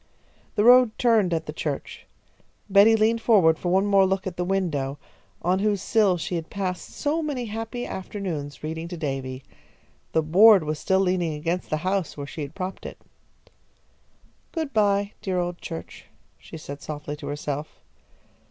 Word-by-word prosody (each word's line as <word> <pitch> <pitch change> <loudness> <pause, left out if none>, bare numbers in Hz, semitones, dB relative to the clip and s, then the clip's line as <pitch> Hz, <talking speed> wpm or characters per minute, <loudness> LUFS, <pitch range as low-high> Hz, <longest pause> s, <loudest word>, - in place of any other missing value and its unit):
The 210 - +2
road 245 -1 +6
turned 225 -7 +3
at 160 -1 -1
the 150 - -6
church. 150 -3 -5 0.6
Betty 205 +3 +6
leaned 225 +1 +2
forward 180 -9 +4
for 175 - -2
one 190 +2 +3
more 200 -1 +5
look 190 0 -1
at 185 -2 -4
the 180 - -2
window, 160 -8 -1 0.5
on 180 +2 +2
whose 205 0 +1
sill 200 -2 +2
she 170 - -4
had 165 -2 -3
passed 185 -2 -4
so 305 +3 -1
many 285 -6 -3
happy 225 +3 -5
afternoons 180 -8 -5
reading 160 +2 -4
to 175 0 -7
Davy. 135 -4 -4 0.7
The 160 - +2
board 195 +4 +7
was 155 0 -3
still 190 0 +2
leaning 180 -4 0
against 165 +4 -3
the 155 - 0
house, 185 -4 -1
where 145 - -5
she 150 - -7
had 140 +3 -6
propped 190 -1 -5
it. - - -10 1.5
"Good 320 -4 -3
bye, 205 -2 +2
dear 185 -2 -2
old 175 0 -2
church," 165 -1 -8 0.3
she - - -10
said 145 -2 -8
softly 150 -1 -6
to - - -8
herself. 145 +1 -5
185 Hz, 170 wpm, -25 LUFS, 155-205 Hz, 1.5 s, board